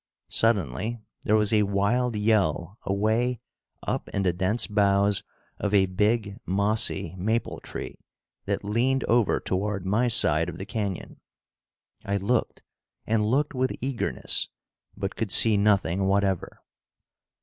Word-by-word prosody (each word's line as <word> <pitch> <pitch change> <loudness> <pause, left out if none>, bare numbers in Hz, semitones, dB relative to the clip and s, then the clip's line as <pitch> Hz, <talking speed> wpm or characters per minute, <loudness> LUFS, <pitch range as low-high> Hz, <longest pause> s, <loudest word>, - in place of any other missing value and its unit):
Suddenly 110 - 0 0.3
there 105 - +3
was 105 0 +2
a 105 - +5
wild 105 +5 +1
yell 105 -2 +1
away 110 +5 +1 0.4
up - - -3
in 100 - -1
the 90 -2 +2
dense 95 +6 0
boughs 100 -1 +2 0.4
of 105 0 0
a 95 -1 +5
big 105 +2 0
mossy 100 -2 0
maple 110 +5 -1
tree - - -7 0.5
that - - -2
leaned 120 +6 +1
over 115 -3 +2
toward 100 0 -2
my 105 +6 +2
side 85 -8 +3
of 85 - -7
the 95 - -6
canyon. 100 -4 -4 0.8
I 100 0 -1
looked 110 +5 -1 0.4
and 110 -1 +1
looked 135 +8 +1
with 130 0 -1
eagerness, 130 -1 -2 0.5
but 100 -1 -3
could 110 -2 -2
see 110 +3 +5
nothing 100 -2 +2
whatever. 95 -2 0
105 Hz, 130 wpm, -26 LUFS, 95-115 Hz, 0.8 s, a